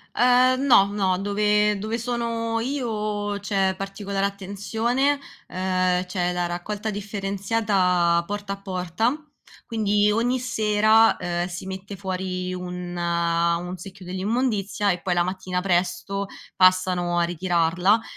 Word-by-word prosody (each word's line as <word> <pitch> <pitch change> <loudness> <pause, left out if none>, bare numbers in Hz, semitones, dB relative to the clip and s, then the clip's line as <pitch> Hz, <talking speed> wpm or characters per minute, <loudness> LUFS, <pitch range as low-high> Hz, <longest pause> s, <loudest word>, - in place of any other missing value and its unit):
Ehm, 250 +2 +4
no, 235 -8 +6
no, 190 -3 +1
dove 210 +1 +2
dove 220 +3 -2
sono 230 -1 -2
io 215 -5 -2
c'è 195 -2 0
particolare 195 0 -3
attenzione, 220 +8 -1 0.3
ehm, 185 -1 0
c'è 180 -1 -1
la 175 0 -1
raccolta 205 +5 -4
differenziata 195 -3 +1
porta 205 0 -4
a 195 - -10
porta; 195 - -2 0.4
quindi 210 -2 +2
ogni 240 +4 +1
sera, 220 -2 +4
ehm, 175 0 -2
si 180 0 -7
mette 190 +1 -6
fuori 185 -1 -3
un 180 -1 -6
un 170 +1 0
secchio 190 +2 -11
dell'immondizia 205 +1 0
e 175 - -2
poi 180 - 0
la 175 0 +2
mattina 185 0 -3
presto 180 +2 0 0.3
passano 185 -1 +3
a 170 - +3
ritirarla. 175 +4 +2
195 Hz, 120 wpm, -24 LUFS, 180-215 Hz, 0.4 s, no